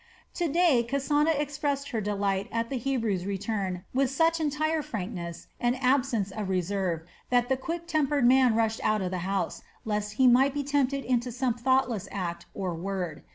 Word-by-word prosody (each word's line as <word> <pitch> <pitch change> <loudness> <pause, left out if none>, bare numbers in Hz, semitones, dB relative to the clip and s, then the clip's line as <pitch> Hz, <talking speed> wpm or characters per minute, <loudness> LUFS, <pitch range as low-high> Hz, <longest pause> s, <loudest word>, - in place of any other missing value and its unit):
To 345 - 0
day 315 -6 +4
Kasana 290 +3 +2
expressed 285 -1 -2
her 225 - -1
delight 200 -1 -1
at 230 +1 -2
the 270 - 0
Hebrew's 225 -8 -1
return 195 -2 -2
with 265 0 +2
such 325 +4 +2
entire 310 +1 0
frankness 180 - -5
and 240 +1 +1
absence 255 -6 +1
of 205 -1 -4
reserve 185 -2 -1 0.3
that 245 0 +2
the 265 - +3
quick 335 +6 -4
tempered 295 -5 +1
man 255 -2 +5
rushed 225 -1 +1
out 215 -2 +2
of 180 - -2
the 185 - -2
house 195 0 -1 0.2
lest 210 -1 -2
he 260 +4 +3
might 260 +3 +5
be 290 - -1
tempted 280 -1 0
into 245 -1 0
some 245 0 0
thoughtless 245 -4 +1
act 170 -3 -4
or 185 -3 -2
word. 180 -2 -4
240 Hz, 175 wpm, -28 LUFS, 200-275 Hz, 0.3 s, man